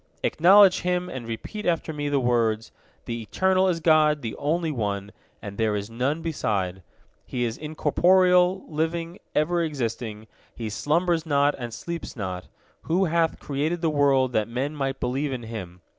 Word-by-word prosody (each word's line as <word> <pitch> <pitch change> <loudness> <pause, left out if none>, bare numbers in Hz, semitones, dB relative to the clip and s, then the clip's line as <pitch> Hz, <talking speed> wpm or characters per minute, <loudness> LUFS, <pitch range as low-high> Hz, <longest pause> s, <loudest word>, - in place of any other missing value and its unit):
Acknowledge 190 +3 +6
Him, 180 0 -1
and 130 -8 -6
repeat 165 - -6
after 165 -2 0
me 145 -1 -3
the 145 -1 +2
words: 115 -3 +1 0.3
The 115 -1 -4
Eternal 190 - +2
is 175 -3 +1
God, 155 -3 +3
the 115 - -4
Only 160 +2 0
One, 100 -5 -3 0.3
and 100 0 -7
there 110 -2 +1
is 105 +2 -4
none 135 +7 -1
beside; 100 - -2 0.4
He 125 - -3
is 115 -1 -1
incorporeal, 180 +5 +3
living, 165 +3 -2 0.2
ever 170 +3 +2
existing; 115 -7 -4 0.3
He 110 -2 -5
slumbers 165 - +1
not 145 -2 +2
and 120 -1 -5
sleeps 170 +8 -6
not, 95 -5 -5 0.4
who 185 +4 +3
hath 165 -1 +1
created 150 +5 -2
the 165 -2 +1
world 135 -3 +3
that 110 -2 +1
men 130 +6 -3
might 135 -2 -2
believe 135 +3 -1
in 125 -2 -4
Him. 95 -6 -7
145 Hz, 160 wpm, -25 LUFS, 115-165 Hz, 0.4 s, Acknowledge